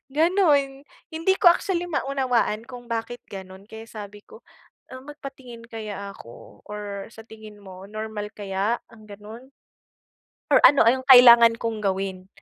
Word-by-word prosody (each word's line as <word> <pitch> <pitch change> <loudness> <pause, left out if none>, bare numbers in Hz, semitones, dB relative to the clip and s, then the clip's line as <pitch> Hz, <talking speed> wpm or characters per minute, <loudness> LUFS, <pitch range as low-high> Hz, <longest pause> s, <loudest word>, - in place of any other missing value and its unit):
ganun. 295 -5 +1 0.3
Hindi 330 +4 +1
ko 355 - +7
actually 355 -1 -3
maunawaan 255 -6 -1
kung 245 -1 -10
bakit 230 +1 -4
ganun? 190 0 -11
Kaya 220 0 -11
sabi 205 -1 -10
ko, 460 0 -17 0.5
ah, 260 - -9
magpatingin 265 -5 -11
kaya 210 -3 -7
ako 120 +1 -15
or 205 -1 -7
sa 225 - -13
tingin 215 -2 -13
mo, 190 -1 -12
normal 215 -1 -6
kaya 200 +3 -2 0.2
ang 215 -2 -17
ganun? 215 +5 -12 1.0
Or - - +6
ano, 285 - +4
ah, 235 - +6
yung 260 - -8
kailangan 235 -2 +8
kong 225 -2 -3
gawin? 190 -1 -3
225 Hz, 145 wpm, -23 LUFS, 205-265 Hz, 1.0 s, kailangan